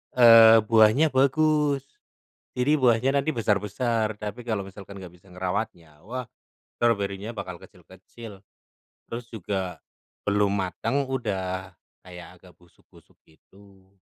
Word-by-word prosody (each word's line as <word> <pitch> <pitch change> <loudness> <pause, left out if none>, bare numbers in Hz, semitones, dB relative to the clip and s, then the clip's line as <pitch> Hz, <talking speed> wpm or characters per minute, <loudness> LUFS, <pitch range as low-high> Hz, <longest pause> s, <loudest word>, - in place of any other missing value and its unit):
eee, 115 -2 +8
buahnya 115 +7 +4
bagus. 140 +1 +2 0.7
Jadi, 130 +4 +1
buahnya 125 +1 +3
nanti 155 +3 -1
besar-besar. 110 +1 -1
Tapi 105 +3 -6
kalau 105 -4 -2
misalkan 100 0 -12
enggak 90 -1 -11
bisa 95 - -25
ngerawatnya, 90 -4 -5
wah, 125 +3 -5 0.6
strawberry-nya 100 -2 -1
bakal 90 -3 -7
kecil-kecil. 100 +2 -14 0.7
Terus 120 +1 -6
juga, 95 -6 -4 0.5
belum 100 0 +1
matang, 100 +8 -2
udah 95 -6 -4 0.3
kayak 90 0 -12
agak 90 -1 -18
busuk-busuk 85 -1 -24
gitu. 95 +4 -22
105 Hz, 110 wpm, -25 LUFS, 95-120 Hz, 0.7 s, eee